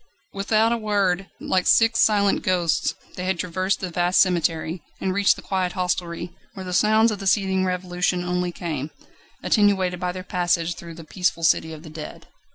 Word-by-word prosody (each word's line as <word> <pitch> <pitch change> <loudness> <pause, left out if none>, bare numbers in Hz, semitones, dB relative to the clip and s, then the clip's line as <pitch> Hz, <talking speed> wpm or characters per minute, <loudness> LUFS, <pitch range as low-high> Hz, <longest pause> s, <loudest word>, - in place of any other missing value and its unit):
Without 215 +3 +2
a 235 - +1
word, 195 -3 0
like 185 -1 0
six 230 0 +4
silent 200 -2 +3
ghosts, 175 -3 0 0.2
they 180 - -5
had 190 -1 0
traversed 185 +3 -1
the 185 -2 -4
vast 175 +2 +2
cemetery, 170 -2 +1 0.2
and 190 -1 -1
reached 200 +1 +3
the - - -12
quiet 185 -2 -1
hostelry, 175 -2 -2 0.2
where 190 - -7
the 180 - -5
sounds 215 +4 +4
of 205 - -4
the 195 - -4
seething 190 -2 +2
revolution 180 0 -1
only 180 0 -1
came, 155 -5 -4 0.5
attenuated 190 -4 +2
by 180 -1 -1
their 185 0 -7
passage 175 -3 0
through 170 0 -10
the 165 - -10
peaceful 170 0 -1
city 160 0 +2
of 155 0 -10
the 160 - -10
dead. 155 -1 -9
180 Hz, 180 wpm, -23 LUFS, 175-195 Hz, 0.5 s, six